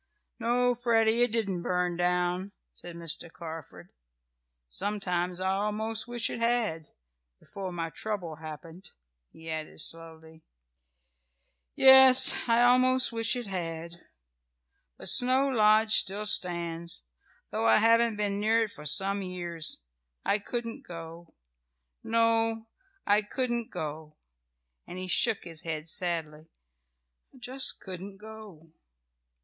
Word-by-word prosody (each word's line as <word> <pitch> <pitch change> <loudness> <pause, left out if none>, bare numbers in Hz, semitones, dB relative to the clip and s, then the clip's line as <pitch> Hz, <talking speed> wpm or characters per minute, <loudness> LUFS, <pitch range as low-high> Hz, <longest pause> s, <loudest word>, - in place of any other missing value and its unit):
"No, 245 +1 +2
Freddie, 230 -1 +2
it 245 -2 +4
didn't 200 -6 +2
burn 180 0 -1
down," 180 +2 0 0.2
said 175 -1 -10
Mr. 165 0 -3
Carford. 160 - -10 0.8
"Sometimes 180 - -2
I 190 0 0
almost 210 +3 -2
wish 240 -1 -1
it - - -5
had 230 -10 0 0.5
before 195 -2 -7
my 165 -2 -4
trouble 180 -7 -4
happened," 160 +3 -10 0.4
he 160 0 -14
added 155 0 -6
slowly. 160 0 -4 1.3
"Yes, 265 -1 +8
I 230 +1 +4
almost 255 +1 +3
wish 230 +1 0
it 245 -1 -4
had. 170 -3 -6 0.9
But - - -8
Snow 260 +2 +4
Lodge 215 -2 +4
still 205 +2 +4
stands, 170 - -1 0.5
though 115 - 0
I 110 - +6
haven't 230 0 +4
been 205 -1 0
near 220 +2 +2
it 215 - -5
for 150 -4 -7
some 195 +7 0
years. 175 - -4 0.4
I 205 - +2
couldn't 230 +2 -5
go. 165 0 -10 0.7
No, 225 0 +1 0.4
I 205 +1 +4
couldn't 240 +1 -2
go," 155 -2 -7 0.7
and 180 - -8
he 185 - -5
shook 200 +3 +2
his 165 -2 -8
head 155 -1 -5
sadly. 160 -2 -4 0.8
"I - - -19
just 260 +2 -3
couldn't 190 +1 -8
go." 215 -6 -12
195 Hz, 120 wpm, -28 LUFS, 165-225 Hz, 1.3 s, Yes